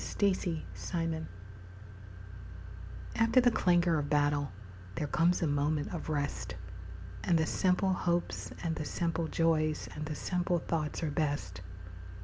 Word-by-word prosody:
Afterglow 165 -3 -1 1.9
After 230 +2 +4
the 245 -1 +5
clangor 175 -5 +3
of 145 -1 -3
battle, 145 -1 +2 0.4
There - - -1
comes 170 +4 +2
a - - +3
moment 145 +2 0
of 170 - -5
rest, 145 -1 -2 0.7
And 175 -3 +3
the 160 - +2
simple 185 +3 +2
hopes 175 -1 -1
and 165 -2 0
the 155 - -4
simple 165 -1 -1
joys 155 -2 +1
And 150 0 -5
the 155 - -3
simple 180 +2 0
thoughts 160 -1 -2
are 155 - 0
best. 140 - -2
165 Hz, 125 wpm, -32 LUFS, 150-175 Hz, 1.9 s, the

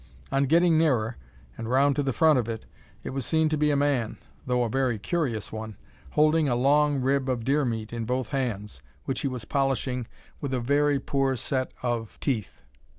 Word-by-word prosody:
On 135 +1 +2
getting 165 +2 +4
nearer, 125 -8 +2 0.4
and 115 0 -4
round 140 +2 +3
to 145 - +1
the 135 -1 0
front 155 +3 +4
of 120 -1 -2
it, 110 -1 -5 0.4
it - - -5
was 135 0 -3
seen 160 +3 +2
to 155 - +1
be 150 0 +2
a 145 - +2
man, 140 -6 0 0.3
though 125 -1 +2
a - - 0
very 125 0 0
curious 120 - -2
one, 110 -1 -6 0.4
holding 155 0 +3
a 120 - +2
long 145 +3 +3
rib 135 +1 +1
of 125 -3 -1
deer 140 +3 +2
meat 115 -2 -3
in 115 -1 -3
both 125 +2 -1
hands, 105 - -3 0.2
which 135 - -2
he - - 0
was 125 -4 -5
polishing 130 -2 -1 0.3
with 135 -2 -2
a - - 0
very 145 +3 +2
poor 135 0 0
set 130 +2 -2
of 120 -3 -2
teeth. 110 - -2
130 Hz, 200 wpm, -26 LUFS, 120-145 Hz, 0.4 s, getting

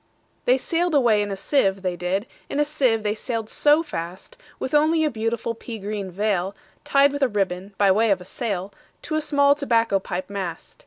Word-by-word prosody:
They 250 +1 +4
sail'd 335 +4 0
away 235 -6 +4
in 205 - -2
a 195 - -2
sieve, 195 -3 +1
they 180 -1 -1
did, 180 +4 -1 0.2
In 285 - -2
a 295 - +4
sieve 260 -7 +1
they 210 0 +1
sail'd 225 0 -4
so 295 +2 +4
fast, 175 - -7 0.2
With 260 - -4
only 315 +2 +4
a 300 - 0
beautiful 230 +1 -2
pea 230 0 -8
green 200 -2 -5
veilTied 205 +8 0
with 285 0 -4
a 270 - +5
ribbon, 195 -2 -2
by 200 -2 +4
way 220 +4 +3
of 195 -2 +3
a 180 - -11
sail, 200 -3 -4 0.3
To - - -5
a 310 - +1
small 285 -2 +4
tobacco 230 -8 +1
pipe 185 0 -5
mast. 190 -5 -6
220 Hz, 200 wpm, -23 LUFS, 195-280 Hz, 0.3 s, a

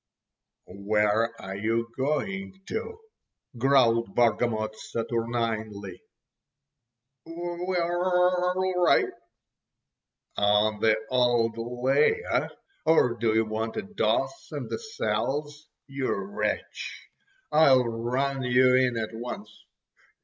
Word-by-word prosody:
"Where 105 +4 0
are 95 0 -6
you 115 +3 -1
going 190 +8 -2
to?" 450 0 -4 0.6
growled 115 -4 +3
Bargamot 110 -2 +1
saturninely. 115 -4 -3 1.2
"We're 175 +2 -3
orl 180 +1 +1
righ'!" - - +4 1.3
"On 105 +1 +2
the 110 0 +3
old 120 -3 +2
lay, 125 - +1
eh? - - +1 0.4
Or 155 -7 +4
do 115 -1 0
you 110 0 +3
want 110 +1 -3
a 220 - -2
doss 210 - -1
in - - -5
the - - -3
cells. 150 - -3 0.2
You 135 -1 -3
wretch, 205 +1 -4 0.4
I'll 135 -5 +5
run 125 +4 -1
you 125 0 +4
in 125 -2 +3
at 110 0 -3
once." 110 -2 -6
120 Hz, 100 wpm, -27 LUFS, 110-160 Hz, 1.3 s, I'll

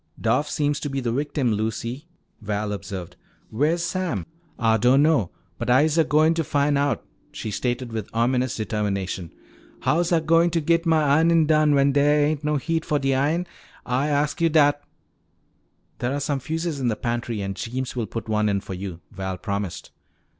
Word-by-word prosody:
"Doff 150 0 +1
seems 145 -1 0
to 145 - -4
be 135 0 -2
the 120 -3 -1
victim, 140 -1 0
Lucy," 115 +7 -3 0.3
Val 105 0 -2
observed. 95 -3 -6 0.4
"Where's 155 +9 +1
Sam?" 185 0 -2 0.3
"Ah 115 -2 +3
don' 125 +5 +4
know. 145 - +3 0.3
But - - -3
I'se 145 +5 +4
a 165 - +5
goin' 155 +1 +3
to 165 0 -1
fin' 145 0 +1
out!" 140 0 0 0.3
she 110 - -5
stated 120 +3 -2
with 110 -2 -4
ominous 125 +2 +1
determination. 100 -5 -3 0.5
"How's 170 +3 +1
Ah - - +5
a - - 0
goin' 165 +2 +4
to 170 0 0
git 165 +2 +1
mah 160 -1 +4
ironin' 160 +3 +4
done 155 -1 +4
when 140 0 +4
dere 145 +1 +3
ain't 150 0 -1
no 150 0 +1
heat 160 +3 -1
fo' 150 -3 0
de 135 -1 +1
iron? 150 +7 +1 0.4
Ah 130 +3 0
asks 150 +2 0
yo' 165 - +4
dat!" 145 -2 +4 1.2
"There 125 +1 -1
are - - -1
some 145 -1 -1
fuses 160 +2 -3
in 130 - 0
the 110 - +1
pantry 120 -1 -3
and 95 0 -4
Jeems 130 +5 -4
will 115 -3 -2
put 115 +1 -6
one 105 -1 +1
in 100 -1 +1
for 95 - -8
you," 90 -2 -6
Val 95 -1 -4
promised. 100 -1 -4
140 Hz, 190 wpm, -24 LUFS, 110-155 Hz, 1.2 s, a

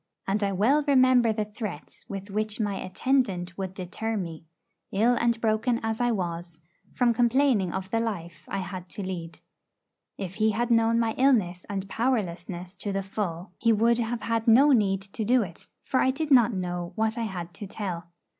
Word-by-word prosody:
And 200 +2 0
I 200 - +1
well 240 +11 +3
remember 255 -4 +5
the 215 -1 -1
threats 210 -7 -8
with 195 0 -6
which 215 +1 -2
my 205 -2 0
'attendant' 185 -5 0
would 190 -1 -5
deter 215 +5 -3
me, 165 -4 -5 0.5
ill 225 +5 +3
and 235 -1 +2
broken 225 +2 +1
as 225 +1 -1
I 245 - +3
was, 175 -5 -3 0.3
from 245 -2 +2
complaining 240 -5 +3
of 190 +1 -5
the 230 - +2
life 170 -8 -4
I 195 - -2
had 185 -2 -7
to 200 - -6
lead. 175 -3 -6 0.8
If 190 -3 -5
he 215 0 +4
had 240 +3 0
known 230 0 +4
my 225 -1 +1
illness 210 -10 +2
and 195 -1 -3
powerlessness 185 -6 -2
to 205 - -3
the 195 0 -1
full, 185 -3 -4
he 230 - +3
would 230 +2 +3
have 235 0 -2
had 230 0 -1
no 265 +6 +7
need 195 -6 +2
to 200 +3 -5
do 245 +2 +3
it, 170 -4 -10
for 260 - 0
I 260 - +3
did 300 +3 -2
not 240 -3 +6
know 180 -2 -3
what 220 0 +1
I 230 -1 -2
had 175 -4 -6
to 200 +5 -8
tell. 185 -4 -5
210 Hz, 190 wpm, -27 LUFS, 185-235 Hz, 0.8 s, no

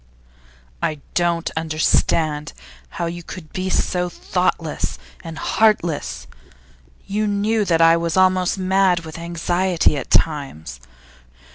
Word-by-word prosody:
'I 155 - -1
don't 170 -1 0
understand 155 -1 +1 0.4
how - - -1
you 170 +1 -4
could 165 -2 -10
be 185 0 -2
so 180 -1 0
thoughtless 175 -2 -2 0.3
and 165 -1 -7
heartless. 205 -8 +1 0.8
You 210 +2 -1
knew 210 +2 +1
that 165 -3 +2
I 165 0 +7
was 170 +1 -1
almost 185 0 +3
mad 190 -2 +2
with 160 0 -9
anxiety 170 -1 +1
at 135 - -5
times. 80 - 0
170 Hz, 115 wpm, -21 LUFS, 160-185 Hz, 0.8 s, I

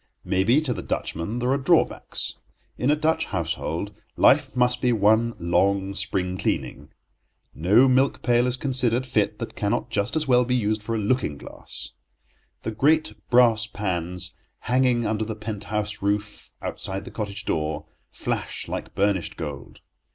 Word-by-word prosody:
Maybe 110 +10 +3
to 135 -6 -1
the - - -5
Dutchman 85 +9 -3
there 125 +1 0
are 140 - +2
drawbacks. 160 +5 +1 0.4
In 125 - 0
a 150 - +5
Dutch 160 +1 +1
household 85 +2 -3 0.2
life 135 -1 +4
must 125 0 +2
be 125 - +3
one 110 +1 +3
long 95 +3 +1
spring 95 -1 -2
cleaning. 70 +2 -2 0.6
No 105 - +5
milk 130 +2 +2
pail 120 0 +3
is 125 0 0
considered 125 -2 +1
fit 105 -4 0
that 115 - -6
cannot 115 +3 -1
just 100 +3 0
as 155 -2 +1
well 125 -1 +5
be 125 +1 0
used 110 -2 0
for 115 +2 -3
a - - 0
looking 105 - 0
glass. - - -10 0.7
The 110 - -2
great 150 +8 +2 0.2
brass 115 -3 +5
pans, 90 -3 -4 0.3
hanging 125 -1 +2
under 110 0 0
the 110 0 -4
pent 105 -2 -6
house 105 0 -2
roof 105 +1 -2
outside 95 +1 -4
the - - -9
cottage 105 -1 -4
door, 75 -1 -1 0.2
flash - - -4
like - - -5
burnished 100 -3 0
gold. 75 -4 -7
110 Hz, 160 wpm, -24 LUFS, 100-125 Hz, 0.7 s, a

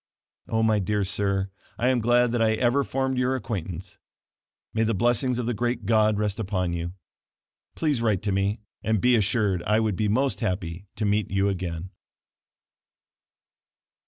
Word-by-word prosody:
Oh, 110 0 +1
my 110 -1 +3
dear 105 +1 0
sir, 100 0 -1 0.3
I 125 - +2
am 130 -1 +2
glad 120 +1 +3
that 120 -1 0
I 110 -1 +4
ever 120 +5 +2
formed 130 -1 -1
your 125 +1 +1
acquaintance; 95 -7 -5 0.7
may 110 - 0
the 115 -1 +2
blessing 120 +4 +2
of 125 - -2
the 120 - 0
great 120 0 -2
God 110 -1 +3
rest 105 0 -1
upon 95 -4 -1
you. 85 +1 -3 0.8
Please 150 -7 0
write 110 -4 +1
to 105 - 0
me, 100 +2 0 0.2
and 110 -1 +1
be 125 +4 +4
assured, 105 -4 +1
I 105 +4 +2
would 110 -3 0
be 105 +3 0
most 130 +2 +1
happy 90 -4 -3
to 110 - -1
meet 105 -1 +1
you 95 +1 +1
again. 90 -1 -4
105 Hz, 165 wpm, -26 LUFS, 95-120 Hz, 0.8 s, I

